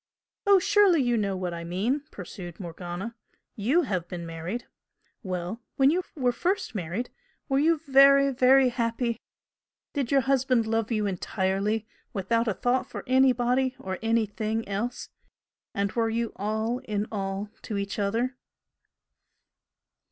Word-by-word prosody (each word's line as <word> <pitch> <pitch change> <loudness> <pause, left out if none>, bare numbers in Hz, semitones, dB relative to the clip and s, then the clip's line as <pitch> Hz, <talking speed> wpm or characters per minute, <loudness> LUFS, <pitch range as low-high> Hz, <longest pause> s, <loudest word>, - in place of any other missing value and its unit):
"Oh, 400 -1 +8
surely 380 -2 +4
you 240 -1 +2
know 200 -3 0
what 180 -2 -3
I 170 0 -5
mean!" 200 - -1
pursued 175 -2 -9
Morgana 175 +4 -6 0.4
"YOU 265 +12 +2
have 185 - -2
been 175 -2 -6
married. 165 +8 -5 0.6
Well, 185 +2 -4
when 270 +1 +5
you 360 +3 +1
were 255 -5 +2
first 365 - -1
married 195 +5 -3 0.4
were 270 -2 +2
you 325 +3 +4
very, 275 0 +7
very 260 +1 +5
happy? 235 -1 -1 0.7
Did 280 -4 -2
your 275 -1 +5
husband 260 -3 +2
love 225 +1 -1
you 215 -2 +1
entirely 195 +3 -1 0.3
without 230 +3 0
a 210 - 0
thought 250 +1 0
for - - -6
anybody 255 0 +3
or 190 0 -5
anything 225 -1 0
else? 210 +5 -3 0.6
and 200 0 -1
were 230 -1 +1
you 230 0 -1
all 220 +4 -1
in 210 -1 -1
all 195 0 -3
to 210 - -4
each 200 +1 -3
other?" 230 +6 0
225 Hz, 140 wpm, -27 LUFS, 195-255 Hz, 0.7 s, Oh